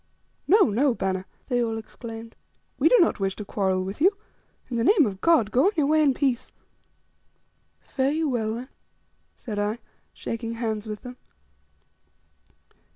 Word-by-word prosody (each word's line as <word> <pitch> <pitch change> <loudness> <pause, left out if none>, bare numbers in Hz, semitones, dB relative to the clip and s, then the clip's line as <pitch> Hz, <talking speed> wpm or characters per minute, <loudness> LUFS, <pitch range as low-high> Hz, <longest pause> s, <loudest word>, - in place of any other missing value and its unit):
"No, 415 +2 +6
no, 250 +4 +2
bana," 190 -2 -2 0.2
they 245 -2 +1
all 225 -1 -2
exclaimed; 225 0 -9 0.4
"we - - +5
do - - +6
not 340 - +3
wish 195 -1 -1
to 210 - -7
quarrel 190 -2 0
with 195 +8 -6
you. 390 +4 +4 0.5
In 240 - -3
the 230 - +1
name 370 - +5
of 195 -3 -4
God! 310 -11 +3
go 255 +5 +3
on 405 - +3
your 300 - +2
way 310 +2 +3
in 280 -4 +3
peace." 260 -4 -1 1.3
"Fare 265 0 -1
you 315 +2 0
well, 225 -4 -1
then," 250 +3 -7 0.7
said 210 -4 -5
I, 210 +2 -1 0.3
shaking 230 0 -5
hands 220 -2 -3
with 210 -1 -6
them. 250 0 -9
235 Hz, 160 wpm, -25 LUFS, 215-285 Hz, 1.3 s, No